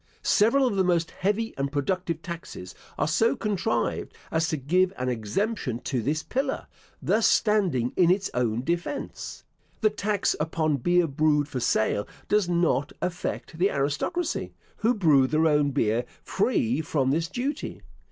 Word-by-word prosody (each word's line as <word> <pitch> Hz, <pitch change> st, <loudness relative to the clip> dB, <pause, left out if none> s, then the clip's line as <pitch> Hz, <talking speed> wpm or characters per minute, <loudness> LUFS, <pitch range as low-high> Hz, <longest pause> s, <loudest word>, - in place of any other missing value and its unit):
Several 235 Hz, +6 st, +4 dB
of 240 Hz, -5 st, 0 dB
the 190 Hz, -, +4 dB
most 170 Hz, -2 st, +1 dB
heavy 210 Hz, +4 st, -1 dB
and 140 Hz, 0 st, -1 dB
productive 165 Hz, +3 st, -2 dB
taxes 165 Hz, -, -7 dB, 0.2 s
are -, -, +1 dB
so 225 Hz, +9 st, +2 dB
contrived, 210 Hz, 0 st, -1 dB, 0.2 s
as 160 Hz, 0 st, +1 dB
to 155 Hz, -, -1 dB
give 180 Hz, +7 st, +2 dB
an 125 Hz, 0 st, -1 dB
exemption 125 Hz, -, -2 dB
to 125 Hz, -4 st, -2 dB
this 150 Hz, +6 st, -1 dB
pillar, 270 Hz, +1 st, -2 dB, 0.4 s
thus 220 Hz, +1 st, +3 dB
standing 185 Hz, -, +2 dB
in 175 Hz, -2 st, +4 dB
its 190 Hz, +2 st, +2 dB
own 120 Hz, -1 st, 0 dB
defence. 175 Hz, -, -4 dB, 0.4 s
The 215 Hz, -2 st, +4 dB
tax 210 Hz, -1 st, 0 dB
upon 155 Hz, -1 st, 0 dB
beer 175 Hz, +6 st, +3 dB
brewed 150 Hz, -1 st, +2 dB
for 135 Hz, -3 st, -4 dB
sale 110 Hz, -3 st, +1 dB, 0.2 s
does 210 Hz, -4 st, +2 dB
not 165 Hz, -5 st, +1 dB
affect 175 Hz, -2 st, -4 dB
the 190 Hz, +3 st, +4 dB
aristocracy, 150 Hz, -, -2 dB, 0.2 s
who 235 Hz, +3 st, +2 dB
brew 150 Hz, -10 st, +4 dB
their 155 Hz, +3 st, +2 dB
own 150 Hz, -2 st, +3 dB
beer 120 Hz, -3 st, +1 dB, 0.2 s
free 125 Hz, +7 st, +1 dB
from 140 Hz, -4 st, 0 dB
this 165 Hz, +3 st, 0 dB
duty. 275 Hz, -, -4 dB
165 Hz, 150 wpm, -26 LUFS, 140-200 Hz, 0.4 s, Several